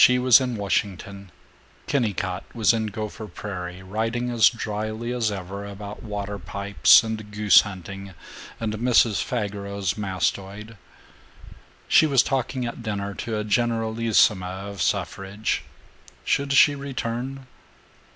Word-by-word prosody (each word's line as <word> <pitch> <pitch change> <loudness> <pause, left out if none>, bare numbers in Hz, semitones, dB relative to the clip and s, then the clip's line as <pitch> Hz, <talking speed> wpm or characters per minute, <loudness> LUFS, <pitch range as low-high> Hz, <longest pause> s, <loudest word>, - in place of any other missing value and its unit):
VIII 125 - +7
She - - +2
was 125 0 +6
in 125 -2 -2
Washington; 100 -1 -3 0.5
Kennicott 100 -8 -1
was 115 0 +4
in 110 -1 -1
Gopher 110 0 -6
Prairie, 90 -2 -7
writing 115 +5 -2
as 115 -3 +6
dryly 110 +1 -4
as 115 -4 0
ever 100 0 -6
about 100 0 -8
water 100 -1 -5
pipes 100 +1 +4
and 110 -2 -5
goose 105 -1 +6
hunting 95 -1 -8 0.4
and 110 -2 -2
Mrs. 115 -1 +3
Fageros's 100 -4 -3
mastoid. 100 +3 -3 1.1
She 155 - +5
was 135 -3 +4
talking 130 -1 -2
at 120 0 -6
dinner 100 -3 -3
to 110 +2 -4
a 105 - -2
generalissima 110 -3 +1
of 100 - -7
suffrage. 100 +2 -1 0.6
Should 140 0 0
she 145 +1 +6
return? 135 -1 -5
105 Hz, 125 wpm, -24 LUFS, 100-115 Hz, 1.1 s, VIII